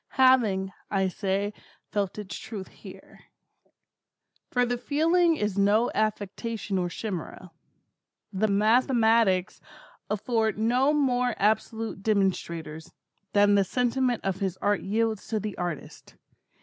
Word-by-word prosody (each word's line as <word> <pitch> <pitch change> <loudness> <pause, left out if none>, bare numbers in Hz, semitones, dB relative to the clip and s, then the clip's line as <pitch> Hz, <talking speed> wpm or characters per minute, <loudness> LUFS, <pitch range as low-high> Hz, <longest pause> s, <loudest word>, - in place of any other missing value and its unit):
Having, 220 -8 +3 0.2
I 195 -2 +1
say, 200 +2 -2 0.4
felt 200 -1 -2
its 205 -2 -6
truth 215 -4 -7
here. - - -14 1.3
For 245 -1 +2
the 245 0 -2
feeling 330 +6 +2
is 210 -7 -2
no 210 +4 +3
affectation 215 -1 -2
or 175 -1 -1
chimera. 185 -2 -6 0.8
The 205 +3 +1
mathematics 220 -2 +3 0.5
afford 220 +1 0
no 245 +6 +2
more 250 -5 +1
absolute 220 0 -1
demonstrations, 170 -6 -1 0.4
than 205 0 +5
the 200 -1 +4
sentiment 250 +3 0
of 190 -1 -1
his 190 -3 -2
Art 205 +1 0
yields 220 +1 -1
to 220 - -1
the 210 -1 -5
artist. 175 -4 -6
215 Hz, 115 wpm, -27 LUFS, 195-235 Hz, 1.3 s, than